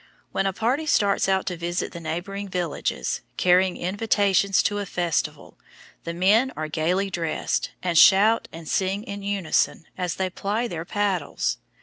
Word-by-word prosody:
When 195 Hz, 0 st, 0 dB
a -, -, +1 dB
party 250 Hz, +10 st, -1 dB
starts 200 Hz, -8 st, +2 dB
out 190 Hz, 0 st, +1 dB
to 180 Hz, -, -2 dB
visit 175 Hz, +1 st, -3 dB
the 170 Hz, -, -8 dB
neighboring 180 Hz, +5 st, -4 dB
villages, 175 Hz, -4 st, -2 dB, 0.2 s
carrying 180 Hz, 0 st, +3 dB
invitations 200 Hz, 0 st, +2 dB
to 205 Hz, 0 st, 0 dB
a 205 Hz, -, -3 dB
festival, 175 Hz, -3 st, -2 dB, 0.5 s
the 170 Hz, -, -3 dB
men 210 Hz, +9 st, +3 dB
are 155 Hz, -, -2 dB
gayly 180 Hz, +5 st, 0 dB
dressed, 165 Hz, -3 st, -1 dB
and 175 Hz, -2 st, -1 dB
shout 205 Hz, +6 st, +6 dB
and 165 Hz, -1 st, -10 dB
sing 195 Hz, +4 st, 0 dB
in 200 Hz, -4 st, -7 dB
unison 195 Hz, -5 st, 0 dB
as 180 Hz, -2 st, -1 dB
they 185 Hz, -1 st, -2 dB
ply 210 Hz, +6 st, -2 dB
their 165 Hz, -6 st, -5 dB
paddles. 195 Hz, -6 st, -1 dB
190 Hz, 155 wpm, -24 LUFS, 175-205 Hz, 0.5 s, shout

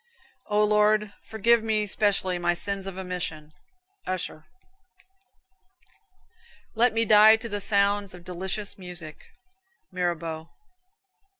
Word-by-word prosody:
"O 210 Hz, 0 st, +2 dB
Lord, 210 Hz, 0 st, +2 dB, 0.2 s
forgive 230 Hz, +2 st, +3 dB
me 215 Hz, -1 st, 0 dB
specially 195 Hz, -3 st, +1 dB
my 175 Hz, 0 st, +1 dB
sins 195 Hz, +2 st, -3 dB
of 190 Hz, -1 st, -6 dB
omission." 175 Hz, -5 st, -5 dB, 0.5 s
Usher. 175 Hz, -4 st, -4 dB, 2.3 s
"Let 240 Hz, +2 st, +3 dB
me 225 Hz, +1 st, +1 dB
die 215 Hz, +1 st, +7 dB
to 225 Hz, +1 st, -6 dB
the 205 Hz, -2 st, -4 dB
sounds 200 Hz, -1 st, +1 dB
of 175 Hz, -, -14 dB
delicious 190 Hz, +3 st, -4 dB
music." 175 Hz, -4 st, -5 dB, 0.7 s
Mirabeau. 170 Hz, -3 st, -3 dB
200 Hz, 105 wpm, -26 LUFS, 180-210 Hz, 2.3 s, die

